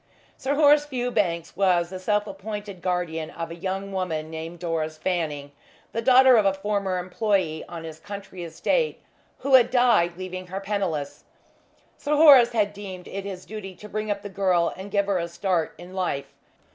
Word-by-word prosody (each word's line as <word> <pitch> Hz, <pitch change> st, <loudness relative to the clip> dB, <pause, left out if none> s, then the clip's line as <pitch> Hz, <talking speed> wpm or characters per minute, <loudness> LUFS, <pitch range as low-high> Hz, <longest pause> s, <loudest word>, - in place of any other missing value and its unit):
Sir 275 Hz, +2 st, -1 dB
Horace 295 Hz, 0 st, +5 dB
Fewbanks 215 Hz, -, -1 dB
was 180 Hz, -2 st, +2 dB
the 185 Hz, -, -5 dB
self 205 Hz, +2 st, +1 dB
appointed 200 Hz, -1 st, -7 dB
guardian 170 Hz, -3 st, -2 dB
of 165 Hz, 0 st, -6 dB
a -, -, -6 dB
young 190 Hz, +2 st, -4 dB
woman 165 Hz, -5 st, -3 dB
named 160 Hz, +2 st, -6 dB
Doris 160 Hz, -2 st, -3 dB
Fanning, 155 Hz, -5 st, -2 dB, 0.4 s
the 230 Hz, -, -2 dB
daughter 255 Hz, +1 st, +7 dB
of 215 Hz, -, +4 dB
a 195 Hz, -, +2 dB
former 195 Hz, -1 st, -1 dB
employee 180 Hz, -3 st, 0 dB
on 170 Hz, -1 st, -7 dB
his 160 Hz, -1 st, -8 dB
country 200 Hz, -2 st, -8 dB
estate, 465 Hz, -, 0 dB, 0.4 s
who 275 Hz, +1 st, -1 dB
had 250 Hz, -2 st, +7 dB
died 235 Hz, -9 st, +3 dB
leaving 185 Hz, 0 st, -6 dB
her 190 Hz, +2 st, -4 dB
penniless. 195 Hz, -8 st, -3 dB, 0.7 s
Sir 300 Hz, 0 st, 0 dB
Horace 280 Hz, -6 st, +8 dB
had 205 Hz, -3 st, +1 dB
deemed 190 Hz, -3 st, -8 dB
it 195 Hz, 0 st, -6 dB
his 190 Hz, -2 st, -7 dB
duty 195 Hz, -3 st, -8 dB
to 210 Hz, -, -11 dB
bring 215 Hz, 0 st, -4 dB
up 200 Hz, -1 st, -2 dB
the 205 Hz, -, -6 dB
girl 185 Hz, -3 st, +1 dB
and 190 Hz, +2 st, -8 dB
give 200 Hz, 0 st, +1 dB
her 200 Hz, -2 st, 0 dB
a 170 Hz, -, -2 dB
start 170 Hz, -1 st, -1 dB
in 175 Hz, +1 st, -11 dB
life. 140 Hz, -7 st, -3 dB
190 Hz, 180 wpm, -25 LUFS, 170-210 Hz, 0.7 s, Horace